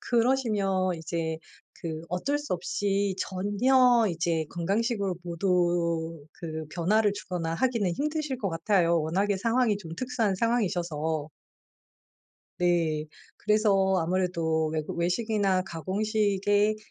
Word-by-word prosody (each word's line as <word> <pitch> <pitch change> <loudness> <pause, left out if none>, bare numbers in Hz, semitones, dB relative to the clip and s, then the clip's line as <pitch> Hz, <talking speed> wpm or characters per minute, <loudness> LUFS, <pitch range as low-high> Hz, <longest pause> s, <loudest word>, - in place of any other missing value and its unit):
그러시면 215 -7 +1
이제 160 0 -3 0.4
그 160 -1 -5
어쩔 270 +12 -1
수 295 0 -5
없이 200 +2 -1
전혀 230 +6 +3
이제 165 -1 0
건강식으로 200 +2 -1
모두 170 -3 0
그 160 -2 -6
변화를 205 +5 +2
주거나 175 -4 -3
하기는 230 -4 +1
힘드실 300 - -2
것 200 - -1
같아요. 170 0 +2
워낙에 190 +6 0
상황이 230 +1 +2
좀 170 -5 -9
특수한 235 -3 0
상황이셔서. 170 -9 -1 1.3
네. 165 -3 +1 0.3
그래서 200 -3 +2
아무래도 165 -2 0
외국 155 +1 -3
외식이나 190 +1 +1
가공식의 205 +3 +1
190 Hz, 260 characters per minute, -27 LUFS, 170-215 Hz, 1.3 s, 전혀